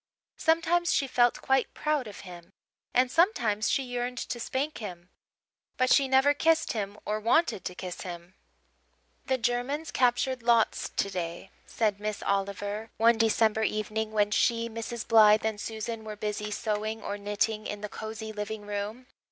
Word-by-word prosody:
Sometimes 335 +1 +2
she 275 - +2
felt 245 -2 +2
quite 265 -1 +1
proud 300 -5 0
of 205 - -9
him; 175 0 -12 0.4
and 250 0 +3
sometimes 235 - +2
she 270 - +1
yearned 245 0 -3
to 240 - -4
spank 275 +6 -2
him. 180 -5 -8 0.7
But 255 -1 +4
she 275 - +4
never 265 +2 +4
kissed 325 +2 +2
him 205 -2 -4
or 210 +1 -1
wanted 230 - +2
to 180 - -4
kiss 180 -1 -6
him. 175 -1 -8 0.9
"The 260 - +2
Germans 250 +6 -1
captured 250 +1 +1
Lodz 230 -1 +2
today," 180 -1 -3 0.2
said 210 -3 0
Miss 210 0 -4
Oliver, 200 +2 -2
one 230 +1 +4
December 220 -1 +3
evening, 215 0 -1
when 210 -1 +2
she, 230 +2 +2
Mrs. 230 +1 -5
Blythe, 215 -1 +6
and 215 -2 -2
Susan 220 0 -5
were 215 -1 -6
busy 210 0 -3
sewing 215 +1 -2
or 205 - -4
knitting 210 +1 -1
in 205 0 -5
the 210 - -3
cosy 220 +1 -6
living 210 0 -5
room. 205 +4 -4
220 Hz, 160 wpm, -28 LUFS, 205-245 Hz, 0.9 s, Blythe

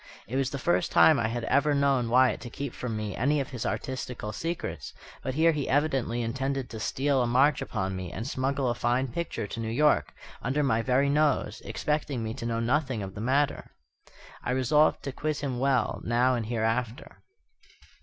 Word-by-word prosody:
It 125 - -5
was 135 -1 +1
the 140 - -4
first 170 +4 +1
time 155 -5 +6
I 115 - +1
had 120 +1 -3
ever 145 +4 +2
known 135 -4 +2
Wyatt 130 +2 +4
to 120 - -7
keep 140 +1 -5
from 115 -3 -4
me 105 -2 -4
any 145 +5 +1
of 135 - -4
his 125 -4 -3
artistical 125 -4 -4
secrets; 165 +9 -4 0.3
but 130 - -3
here 165 +2 +5
he 150 -4 -3
evidently 135 -5 +1
intended 135 +2 -2
to 110 - -6
steal 135 +4 +1
a 120 - +1
march 135 +5 +3
upon 95 -3 -3
me 90 -2 -5
and 115 - -5
smuggle 135 0 -1
a - - +1
fine 120 +2 0
picture 170 -2 -3
to 110 - -6
New 110 -1 -3
York, 150 +6 +2 0.3
under 135 +5 0
my 115 -5 +2
very 130 +3 +2
nose; 150 -1 +1
expecting 145 -5 -2
me 110 0 -3
to 115 - -5
know 115 -1 -1
nothing 125 -1 0
of 95 -1 -7
the 100 - -7
matter. 135 +5 0 0.7
I 125 - -1
resolved 150 +4 +3
to 140 - -3
quiz 150 +2 -3
him 130 -4 -2
well, 135 0 +1
now 120 +2 +2
and 115 -3 -2
hereafter. 115 +1 -2
130 Hz, 195 wpm, -28 LUFS, 115-140 Hz, 0.7 s, time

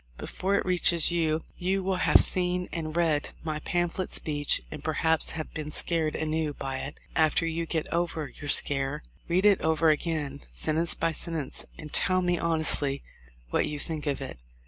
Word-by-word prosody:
Before 195 +2 -2
it - - 0
reaches 175 -2 +4
you 160 -2 0 0.2
you 190 +2 0
will 190 0 0
have - - +5
seen 180 0 +1
and 155 -2 -4
read 160 -4 +1
my 155 -2 -3
pam 175 +3 0
phlet 185 +2 -4
speech 145 -2 0
and - - -8
perhaps 160 -1 +1
have 155 -1 -6
been 155 -1 -5
scared 160 0 0
anew 155 -1 -1
by 135 -1 -4
it. 145 - -7 0.2
After 160 +1 +3
you 165 0 -2
get 160 -2 -1
over 170 -3 -1
your 145 - -9
scare 145 +1 +1 0.2
read 180 +3 +1
it 205 -2 +5
over 160 0 +3
again, 150 -2 -1
sentence 160 +2 +2
by 165 - 0
sentence, 160 -2 -2
and 155 -2 -9
tell 185 -1 +2
me 175 -1 +1
honestly 155 -4 +3 0.5
what - - +1
you 150 - -4
think 155 0 -5
of 140 -1 -1
it. 130 - -7
160 Hz, 180 wpm, -27 LUFS, 150-175 Hz, 0.5 s, have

